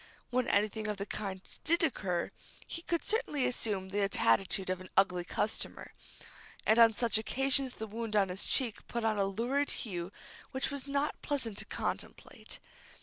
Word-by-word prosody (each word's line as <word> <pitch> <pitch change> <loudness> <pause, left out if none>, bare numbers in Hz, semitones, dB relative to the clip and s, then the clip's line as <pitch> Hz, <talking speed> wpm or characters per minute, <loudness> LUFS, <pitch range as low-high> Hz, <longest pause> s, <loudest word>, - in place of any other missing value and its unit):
When 250 0 +1
anything 215 +1 +1
of 210 -1 -2
the 200 - -3
kind 195 -3 -4 0.2
did 335 +1 +4
occur, 190 - 0 0.3
he 335 - -5
could 335 -1 -1
certainly 415 - +1
assume 200 -6 +1
the 200 0 +1
attitude 185 - +3
of 185 0 -2
an 185 - -10
ugly 180 -2 +4
customer, 210 +5 -2 0.7
and 220 +2 +5
on 230 -1 +8
such 230 0 +2
occasions 270 +2 +1
the 220 - -4
wound 220 0 -4
on 195 -2 +4
his 180 +2 -3
cheek 240 -6 0
put 235 -1 -2
on 215 -2 +2
a 195 - +3
lurid 240 +9 0 0.2
hue 180 -3 -4 0.4
which 265 +3 -1
was 280 -1 -4
not 280 +1 -1
pleasant 240 -8 -1
to - - -2
contemplate. - - -4
220 Hz, 170 wpm, -32 LUFS, 195-265 Hz, 0.7 s, on